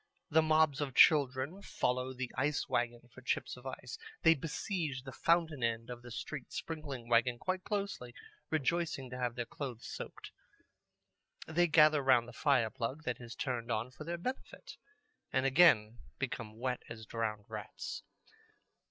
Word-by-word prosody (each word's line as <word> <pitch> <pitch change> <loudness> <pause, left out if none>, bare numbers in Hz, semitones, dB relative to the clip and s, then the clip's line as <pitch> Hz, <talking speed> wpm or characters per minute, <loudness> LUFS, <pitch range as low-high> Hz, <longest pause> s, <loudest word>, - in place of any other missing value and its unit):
The 160 +2 +6
mobs 155 -2 +3
of 135 -4 -3
children 140 +3 +5
follow 130 -7 -1
the 130 -1 -4
ice 145 +2 0
wagon 120 0 0
for 130 - -12
chips 130 - -1
of 125 +1 -10
ice. 125 -2 -7 0.2
They 165 - +8
besiege 155 -2 -3
the 135 - -7
fountain 165 0 +2
end 115 0 -1
of 120 -1 -7
the 120 - -10
street 130 +3 -6
sprinkling 145 -7 -5
wagon 120 +1 +3
quite 185 +6 -2
closely, 200 - -3 0.3
rejoicing 155 -3 0
to 125 - -5
have 120 -1 -1
their 120 -1 -2
clothes 120 -2 -6
soaked. - - -7 1.1
They 175 +2 +3
gather 155 -2 +6
round 130 -3 +4
the 120 - -10
fire 125 -5 +2
plug 130 +7 -3
that 125 -2 -3
is 120 -1 -8
turned 120 -3 -2
on 115 +3 -1
for 130 +4 -9
their 170 +2 -3
benefit, 260 - -6 0.5
and 130 0 +2
again 125 -7 +5 0.2
become 110 -1 -4
wet 125 +1 -2
as 110 -1 -8
drowned 110 -2 -3
rats. - - -6
130 Hz, 160 wpm, -34 LUFS, 120-155 Hz, 1.1 s, They